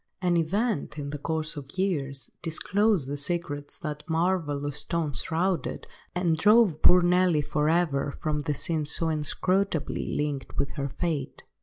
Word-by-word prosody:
An 180 -2 +1
event, 170 - 0
in 145 -1 -4
the 145 - -5
course 160 +1 -2
of 145 +4 -9
years, 140 -9 -1
disclosed 190 0 +1
the 145 +1 -3
secrets 145 -2 -2
that 150 -3 -5
marvellous 160 -4 0
stone 160 -1 -1
shrouded, 175 +5 -1 0.3
and 175 -3 +1
drove 210 -3 +5
poor 180 0 +7
Nelly 175 -3 +3
for 150 +1 0
ever 150 -5 +1
from 150 -1 -1
the 145 0 -1
scene 160 -2 -1
so 160 +2 +1
inscrutably 160 +2 0
linked 145 -3 -3
with 140 - 0
her 140 -2 -3
fate. 150 -2 -3
160 Hz, 150 wpm, -27 LUFS, 145-180 Hz, 0.3 s, poor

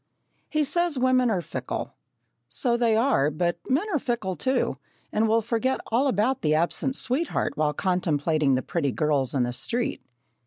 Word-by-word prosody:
He 305 -1 +1
says 345 +1 +1
women 255 -1 +3
are 185 -5 0
fickle. - - -5 0.6
So 240 -3 +1
they 235 -2 +2
are, 225 - +3
but 170 +3 -1
men 285 +10 +2
are 300 - +2
fickle 230 -7 -2
too, 260 +6 0 0.3
and 220 +1 +2
will 225 +1 +2
forget 245 +4 0
all 250 +5 +3
about 250 +2 +1
the 155 -1 +2
absent 175 +11 0
sweetheart 290 +6 -1
while 150 -1 +1
contemplating 155 -6 +1
the 130 - -1
pretty 145 -6 -1
girls 145 -4 0
in 130 - +2
the 120 0 -2
street. 235 - -2
220 Hz, 165 wpm, -25 LUFS, 155-255 Hz, 0.6 s, women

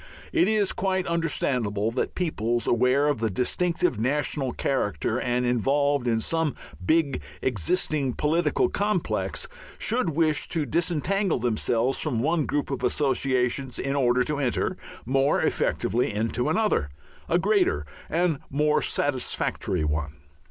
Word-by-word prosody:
It 335 0 +4
is 215 -3 +2
quite 190 -1 0
understandable 125 -10 0
that 125 - -2
peoples 120 -9 -1
aware 125 +4 +3
of 145 -6 0
a 110 - +1
distinctive 165 - 0
national 135 +1 0
character 120 -3 -1
and 125 0 0
involved 135 +2 +1
in 115 -1 +1
some 160 +1 0 0.3
big 145 - +2 0.2
existing 130 - 0
political 155 +5 +1
complex, 200 -3 -1 0.3
should 230 -4 0
wish 155 0 +1
to 160 -3 0
disentangle 175 - 0
themselves 120 +1 0
from 115 - -1
one 155 +4 +1
group 145 -1 -1
of 135 - -3
associations 130 -2 0
in 135 +1 -2
order 125 -2 +3
to 150 +1 -2
enter 130 -4 0 0.3
more 135 +3 +2
effectively 120 +2 0
into 115 +5 -1
another, 205 - +1 0.4
a 170 - +3
greater, 185 - +2 0.2
and 165 -3 +1
more 150 +2 +2
satisfactory 125 - -1
one. 75 0 -2
140 Hz, 130 wpm, -26 LUFS, 120-165 Hz, 0.4 s, It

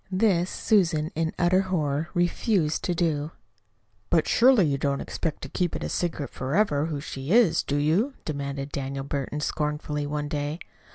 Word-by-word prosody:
This, 185 -2 +2
Susan, 170 -7 +1
in 160 0 -1
utter 180 +2 +3
horror, 160 -4 -1
refused 175 -2 +1
to 175 - 0
do. 160 -2 0 0.8
"But 165 - +3
surely 240 -5 +5
you 140 -2 0
don't 140 0 0
expect 165 -4 -4
to - - -4
keep 175 +1 -1
it - - -3
secret 160 -5 -2
forever 150 +1 +1
who 150 -3 -3
she 135 -1 -7
is, 225 -6 +5
do 145 - -2
you?" 180 - +1
demanded 140 -2 -4
Daniel 135 0 -3
Burton 140 +1 -3
scornfully 150 -1 -2
one 150 0 -2
day. 145 0 -2
155 Hz, 160 wpm, -26 LUFS, 145-175 Hz, 0.8 s, surely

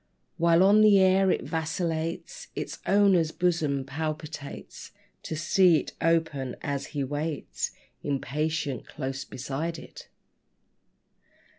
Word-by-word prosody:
While 170 +1 +5
on 205 +2 +6
the 210 -2 +7
air 190 0 +4
it - - +1
vacillates, 165 0 -3
Its - - -5
owner's 195 -5 +4
bosom 160 -7 0
palpitates 155 0 -6 0.3
To 160 - -5
see 170 +2 +4
it - - -7
open, 160 -6 +1
as 140 -2 -3
he 140 - +1
waits 145 - -3 0.3
Impatient 145 -1 -2
close 135 -1 -4
beside 145 +6 -4
it. - - -11
160 Hz, 110 wpm, -27 LUFS, 140-175 Hz, 0.3 s, the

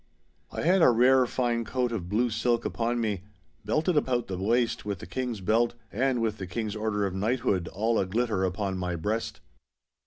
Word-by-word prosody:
I - - -4
had 180 +3 +4
a - - +7
rare 125 +2 +5
fine 120 -2 0
coat 125 +1 -1
of 95 -7 -4
blue 115 +4 +1
silk 115 +2 0
upon 120 +1 -1
me, 105 -5 -1 0.4
belted 155 - +1
about 125 -5 +1
the 95 - -5
waist 115 +4 +1
with 100 -2 -3
the - - -9
King's 120 +2 -4
belt, 115 +5 +2 0.2
and 130 +2 +1
with 110 -2 -1
the 95 - -5
King's 105 +3 -3
order 105 -1 -1
of 95 - -2
knighthood 100 -3 0
all 110 +5 0
a 95 - 0
glitter 110 -1 0
upon 95 0 -1
my 90 -1 -2
breast. 105 +7 -3
115 Hz, 190 wpm, -28 LUFS, 100-120 Hz, 0.4 s, a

